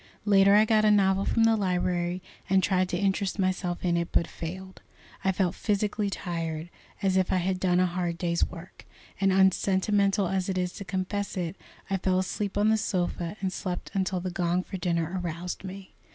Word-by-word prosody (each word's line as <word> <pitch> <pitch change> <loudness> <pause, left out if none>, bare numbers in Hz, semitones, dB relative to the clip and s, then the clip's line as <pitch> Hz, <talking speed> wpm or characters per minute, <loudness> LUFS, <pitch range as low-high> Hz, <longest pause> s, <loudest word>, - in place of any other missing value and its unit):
Later 200 -1 +6
I 215 +1 +6
got 215 -1 +3
a 215 - +5
novel 195 -1 +3
from 230 - +2
the 225 0 +5
library, 180 -2 -1 0.3
and 190 0 +4
tried 185 0 +2
to 175 - -1
interest 195 0 0
myself 185 -2 -1
in 170 -1 +2
it, 170 0 -1
but 170 - +2
failed. 185 +4 -8 0.4
I 190 - +3
felt 185 -2 0
physically 210 0 -1
tired, 165 -3 -4 0.3
as 190 -1 +2
if 185 -1 +2
I - - +2
had 185 +1 0
done 180 -1 +2
a 185 - +4
hard 175 -1 -2
day's 170 -1 0
work, 175 0 -7 0.3
and, 195 0 +3
unsentimental 195 +1 +3
as 190 +1 -1
it 190 - -1
is 180 -1 -1
to - - -7
confess 190 +2 -3
it, 175 -1 -2 0.3
I 195 - 0
fell 185 0 +1
asleep 195 +2 -2
on 210 +1 +3
the 220 - +4
sofa, 180 -2 -2
and 190 -1 -1
slept 185 -2 -4
until 190 -1 0
the 180 +1 -4
gong 175 0 0
for 190 - -6
dinner 175 0 -1
aroused 175 +2 -4
me. 190 0 -9
185 Hz, 195 wpm, -27 LUFS, 175-195 Hz, 0.4 s, Later